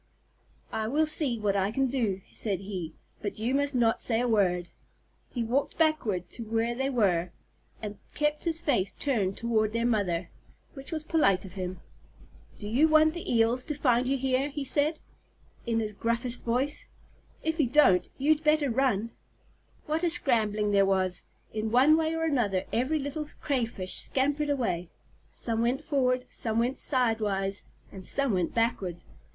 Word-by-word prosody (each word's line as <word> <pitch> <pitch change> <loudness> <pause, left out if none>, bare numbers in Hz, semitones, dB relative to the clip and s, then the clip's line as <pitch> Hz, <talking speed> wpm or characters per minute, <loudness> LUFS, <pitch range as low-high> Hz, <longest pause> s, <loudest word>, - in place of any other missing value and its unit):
"I 220 0 -2
will 300 +7 +2
see 295 -5 0
what 205 -2 0
I 195 0 +1
can 270 +5 +1
do," 230 -7 -1
said 200 -4 -2
he, 185 -5 -6 0.3
"but 200 -1 -4
you 230 +4 -1
must 285 0 +1
not 230 -2 +2
say 225 -2 +2
a 245 - +1
word." 180 -6 +1 0.6
He 240 - -2
walked 250 +5 -1
backward 260 - +1
to 235 - -7
where 225 +2 0
they 265 +3 -1
were, 185 -9 +1 0.5
and 205 -1 -6 0.2
kept 300 +1 0
his 330 -1 +1
face 200 - +1
turned 210 -9 -1
toward 220 -2 0
their 230 0 0
mother, 190 -7 0 0.4
which 270 +1 -8
was 315 -2 -3
polite 200 - +2
of 185 - -10
him. 185 -1 -5 0.8
"Do 205 - -6
you 260 +9 +4
want 310 0 +5
the 345 - -5
Eels 235 +2 +2
to 300 - -3
find 255 -3 +2
you 275 +1 +1
here?" 265 +2 0
he 285 -1 -5
said, 300 +3 +1 0.7
in 230 -1 +1
his 215 -1 -3
gruffest 235 +3 -2
voice. 270 - -1 0.6
"If 320 +1 -1
you 290 - +3
don't, 210 -10 +4
you'd 305 +3 +2
better 300 -3 +3
run." 230 -3 +1 0.7
What 315 +3 -1
a 345 - +3
scrambling 215 -9 +2
there 200 -1 +5
was! 190 -2 0 0.3
In 220 0 -2
one 260 +7 +6
way 320 0 0
or 325 - -1
another, 230 -12 +1
every 260 +7 +1
little 290 +1 -4
Crayfish 230 -9 -1
scampered 290 +2 0
away. 200 -11 -1 0.4
Some 230 -1 -2
went 250 +5 0
forward, 255 -4 +1
some 225 -1 -2
went 245 +3 0
sidewise, 215 -7 0 0.3
and 190 - -9
some 275 +3 +2
went 180 -3 -1
backward. 225 -7 0
235 Hz, 170 wpm, -28 LUFS, 205-285 Hz, 0.8 s, one